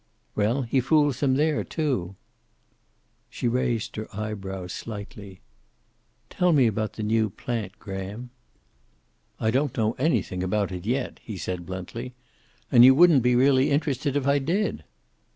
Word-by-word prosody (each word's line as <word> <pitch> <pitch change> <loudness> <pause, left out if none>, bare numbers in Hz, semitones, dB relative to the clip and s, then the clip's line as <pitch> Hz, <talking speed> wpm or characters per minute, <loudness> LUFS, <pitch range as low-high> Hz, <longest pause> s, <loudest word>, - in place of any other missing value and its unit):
"Well, 115 +6 +1
he 125 +3 +1
fools 145 +1 +2
them 135 -2 +2
there, 150 +2 +1
too." 125 - -2 1.1
She - - -3
raised 120 -2 -1
her 110 - -4
eyebrows 95 -4 -5
slightly. 100 -3 -8 0.9
"Tell 180 -1 +1
me 135 -5 +5
about 110 -2 -1
the 110 - -5
new 110 0 +1
plant, 110 -1 -5
Graham." 100 +5 -7 1.1
"I 110 - +1
don't 135 +2 0
know 110 -1 +2
anything 130 - 0
about 100 +2 -1
it 90 +2 -6
yet," 125 +2 -2
he 105 -4 -7
said 90 0 -5
bluntly. 115 +7 -6 0.6
"And 120 - +8
you 130 +1 +8
wouldn't 165 -3 +6
be 125 +1 +3
really 130 +1 +4
interested 145 -1 0
if 145 -2 0
I 140 +1 +3
did." 175 +10 -1
120 Hz, 145 wpm, -25 LUFS, 100-135 Hz, 1.1 s, And